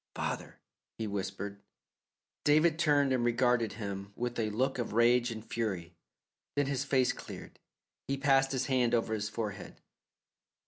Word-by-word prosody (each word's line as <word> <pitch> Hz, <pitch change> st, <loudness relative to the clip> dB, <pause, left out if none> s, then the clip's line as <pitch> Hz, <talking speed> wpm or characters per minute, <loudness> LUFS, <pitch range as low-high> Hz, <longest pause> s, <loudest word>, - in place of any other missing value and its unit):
"Father," -, -, -4 dB, 0.4 s
he 110 Hz, -, -2 dB
whispered. 100 Hz, 0 st, -4 dB, 0.8 s
David 155 Hz, +2 st, +4 dB
turned 145 Hz, -4 st, +3 dB
and 125 Hz, -2 st, +1 dB
regarded 120 Hz, -1 st, +2 dB
him 100 Hz, -2 st, -6 dB
with 120 Hz, 0 st, -3 dB
a 110 Hz, -1 st, +1 dB
look 130 Hz, +5 st, 0 dB
of 120 Hz, -, -3 dB
rage 120 Hz, +2 st, +4 dB
and 110 Hz, -1 st, -6 dB
fury, 95 Hz, -7 st, -3 dB, 0.6 s
then 145 Hz, 0 st, +2 dB
his 140 Hz, -1 st, -1 dB
face 130 Hz, -3 st, +2 dB
cleared; -, -, -10 dB, 0.5 s
he 140 Hz, -, 0 dB
passed 135 Hz, -1 st, +3 dB
his 130 Hz, -1 st, 0 dB
hand 125 Hz, -3 st, +2 dB
over 115 Hz, -1 st, 0 dB
his 105 Hz, -1 st, -2 dB
forehead. 105 Hz, -3 st, -5 dB
120 Hz, 145 wpm, -31 LUFS, 105-135 Hz, 0.8 s, David